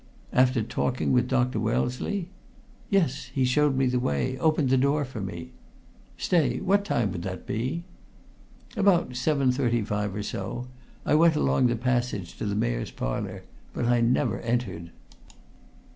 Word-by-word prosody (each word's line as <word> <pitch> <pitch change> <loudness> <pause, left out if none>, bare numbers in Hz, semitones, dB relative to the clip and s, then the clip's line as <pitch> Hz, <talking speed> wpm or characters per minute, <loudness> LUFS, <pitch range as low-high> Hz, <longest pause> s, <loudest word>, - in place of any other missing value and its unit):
"After 125 -2 +3
talking 125 +3 -1
with 125 -1 +3
Dr. 125 -1 +1
Wellesley?" 125 - -1 0.6
"Yes. 165 -11 +1
He 130 -2 +2
showed 145 +2 +3
me 135 - +3
the 125 0 +1
way 125 - -1
opened 155 -4 +2
the - - +5
door 140 +3 +2
for 125 -4 -7
me 85 -3 -6 0.3
" - - -28
"Stay, 140 -8 +2
what 200 +2 +2
time 120 - 0
would 85 - -4
that 90 0 -6
be?" 130 +10 -2 0.9
"About 195 -6 +3
7.35 125 -7 0
or 105 - -3
so. 125 +3 -4 0.4
I - - +2
went 160 +1 +5
along 130 -3 +3
the 120 - +1
passage 120 -6 -1
to - - -2
the 100 - -1
Mayor's - - -1
Parlour, - - -4 0.3
but - - -1
I 120 0 +3
never 120 +2 +1
entered." 115 -8 -2
125 Hz, 150 wpm, -26 LUFS, 110-140 Hz, 0.9 s, the